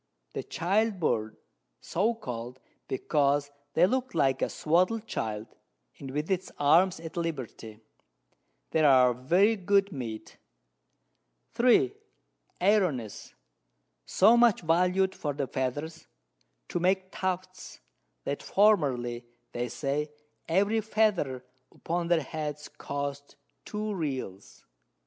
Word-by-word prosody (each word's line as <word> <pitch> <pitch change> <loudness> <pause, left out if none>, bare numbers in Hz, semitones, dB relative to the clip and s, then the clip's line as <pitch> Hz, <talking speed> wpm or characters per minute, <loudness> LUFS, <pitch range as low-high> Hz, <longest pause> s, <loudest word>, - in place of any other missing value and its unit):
The - - -3
Child 200 +4 0
Bird, 110 -8 -1 0.4
so 215 +7 0
call'd, 125 - -7 0.3
because 145 +1 +1 0.2
they 170 - +6
look 255 +1 -1
like 135 -4 +2
a - - +1
swadled 185 +8 +1
Child, 110 - -3 0.5
with 145 +5 -4
its 185 -1 -1
Arms 170 +6 +4
at 165 -1 -9
Liberty: 130 -9 -5 0.9
They 160 - +2
are 130 -4 +6
very 175 - +3
good 200 0 +2
Meat. 120 -7 -7 1.2
3. 255 +12 +4 0.7
Airones, 180 - 0 0.7
so 215 +5 +5
much 235 -2 +4
valued 180 +3 +2
for 145 -2 -3
the 140 -1 -1
Feathers, 140 +5 -4 0.6
to - - -1
make 185 +1 +1
Tufts, 185 0 -4 0.4
that 140 - -3
formerly, 130 - +2 0.2
they 120 0 -3
say, 145 +5 -2 0.4
every 205 +6 +2
Feather 195 - 0 0.3
upon 170 +1 -3
their 170 -1 +3
Heads 150 0 -5
cost 140 0 -5 0.3
2 215 0 -3
Reals. 130 - -5
160 Hz, 110 wpm, -28 LUFS, 135-190 Hz, 1.2 s, they